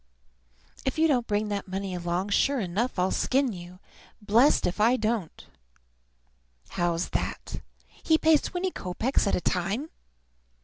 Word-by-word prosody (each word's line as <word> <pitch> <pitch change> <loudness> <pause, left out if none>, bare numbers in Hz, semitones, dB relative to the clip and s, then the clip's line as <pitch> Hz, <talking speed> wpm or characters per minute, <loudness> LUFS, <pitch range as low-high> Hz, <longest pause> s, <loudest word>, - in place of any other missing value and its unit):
If 265 - -2
you 320 +1 +4
don't 250 -6 +1
bring 210 0 0
that 200 -1 -3
money 190 0 -4
along, 175 +2 -2
sure 275 +6 +2
enough 210 +6 -2
I'll 180 +1 +1
skin 265 -3 +1
you, 175 0 -10 0.4
blessed 225 +7 +4
if 180 - -2
I 235 +4 +4
don't. 215 -6 -2 1.2
How's 175 0 -1
that? - - -4 0.3
He 320 - +1
pays 315 -2 +4
twenty 365 +1 -2
kopeks 210 - -1
at - - +2
a - - -2
time! 195 - -1
210 Hz, 140 wpm, -27 LUFS, 180-265 Hz, 1.2 s, you